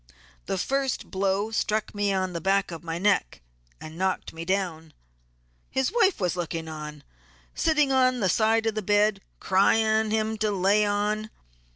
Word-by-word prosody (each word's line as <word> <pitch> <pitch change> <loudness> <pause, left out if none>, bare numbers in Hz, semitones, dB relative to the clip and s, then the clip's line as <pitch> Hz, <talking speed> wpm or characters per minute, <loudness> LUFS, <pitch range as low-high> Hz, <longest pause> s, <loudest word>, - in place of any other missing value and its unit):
The - - -1
first 270 +5 -2
blow 195 +2 0
struck 215 -1 -1
me 205 -1 0
on 185 -1 -1
the 170 - -4
back 195 +1 +1
of 165 0 -8
my 165 0 -4
neck 195 - +1 0.4
and 155 +2 -10
knocked 190 0 -1
me 165 +1 -7
down; 170 -4 -2 0.8
his 265 -1 0
wife 420 -5 +2
was 180 -3 0
looking 165 -2 -4
on, 150 -2 -8 0.5
sitting 300 -4 +2
on 255 -1 +3
the 195 - +1
side 220 +4 +2
of 225 - +1
the 215 - -2
bed 205 0 +2 0.2
crying 220 +3 +2
to 215 - +1
him 220 0 -1
to 215 0 +1
lay 200 +2 +2
on. 210 +1 -1
205 Hz, 170 wpm, -26 LUFS, 180-220 Hz, 0.8 s, on